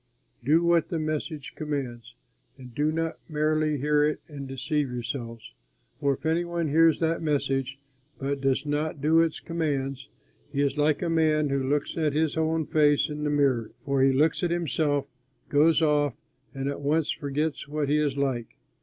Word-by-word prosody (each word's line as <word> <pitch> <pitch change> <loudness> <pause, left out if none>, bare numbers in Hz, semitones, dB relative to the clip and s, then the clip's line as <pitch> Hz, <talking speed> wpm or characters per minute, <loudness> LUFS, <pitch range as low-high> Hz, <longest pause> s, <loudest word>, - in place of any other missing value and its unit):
Do 155 +7 +4
what 170 -1 +3
that 170 - -1
message 155 -1 -3
commands, 125 -6 -5 0.4
and 125 -2 -12
do 150 +4 +1
not 165 0 -2
merely 155 0 +1
hear 150 +2 +2
it 150 0 +1
and 140 -3 -7
deceive 135 +2 -1
yourselves. 115 - -6 0.5
For 140 -2 +1
if 140 - -15
any 165 +2 +2
one 170 -2 -2
hears 165 +2 +4
that 165 0 +1
message 135 -3 -1 0.4
but 140 +2 -3
does 135 +2 +1
not 150 +1 -2
do 160 +4 +4
as 165 -1 0
it - - -15
commands, 140 -5 -2 0.4
he 140 - 0
is 140 -1 0
like 150 +2 +1
a - - 0
man 155 -2 +2
who 140 0 0
looks 145 0 0
at 155 -3 +1
his 155 0 +1
own 160 0 0
face 145 0 +3
in 150 0 -5
the 150 - 0
mirror, 135 -6 +1
for 140 -2 +1
he 135 0 +5
looks 150 +4 +2
at 175 - +1
himself, 155 -4 0 0.4
goes 160 +3 +4
off, 145 -4 +2 0.4
and 135 0 -4
at 140 +1 -3
once 150 +2 +1
forgets 145 +1 -2
what 150 0 -2
he 150 +2 +2
is 145 -2 0
like. 130 -4 -2
150 Hz, 180 wpm, -27 LUFS, 140-155 Hz, 0.5 s, he